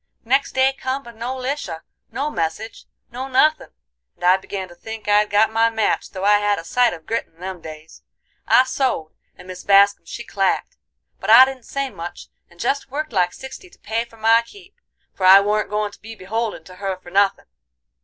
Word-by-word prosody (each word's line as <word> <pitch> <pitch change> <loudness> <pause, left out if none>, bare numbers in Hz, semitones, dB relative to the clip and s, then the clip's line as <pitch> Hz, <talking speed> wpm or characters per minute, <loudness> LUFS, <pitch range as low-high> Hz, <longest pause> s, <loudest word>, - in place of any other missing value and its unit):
Next 270 +4 +1
day 265 +1 +3
come, 270 0 -4
but 235 -2 -13
no 240 +3 -4
Lisha, 260 - -4 0.3
no 290 +3 -2
message, 210 - -4 0.3
no 255 +3 -5
nuthin', 305 +4 +2 0.5
and - - -16
I 180 +1 +6
began 190 0 -6
to - - -13
think 220 +5 -9
I'd 210 0 +3
got 210 +2 +3
my 225 +1 +3
match 225 -1 -1
though 190 -1 -7
I 205 0 +5
had 205 0 +1
a 165 - -6
sight 245 +7 +2
of 160 -2 -10
grit 230 - -2
in 160 - -32
them 185 -1 -6
days. 155 0 -11 0.5
I 255 - +6
sewed, 260 - -2 0.3
and - - -14
Mis 185 0 -9
Bascum 200 -2 +4
she 235 - -7
clacked; 195 -4 -1 0.4
but - - -5
I 240 +4 +10
didn't 260 -3 -8
say 275 -1 -3
much, 170 +1 -9 0.2
and 175 -1 -22
jest 275 +5 -1
worked 295 0 -4
like 180 -2 +2
sixty 265 - -11
to - - -21
pay 225 +2 -2
for 230 -1 -18
my 225 +1 +4
keep, 380 +11 -16 0.4
for 190 - -7
I 190 +1 +10
warn't 210 +1 0
goin' 210 0 -1
to - - -17
be 225 +1 -10
beholden 215 -1 -4
to 180 +2 -14
her 195 -1 -3
for 175 -1 -15
nothin'. 200 +1 +2
215 Hz, 205 wpm, -21 LUFS, 190-255 Hz, 0.5 s, I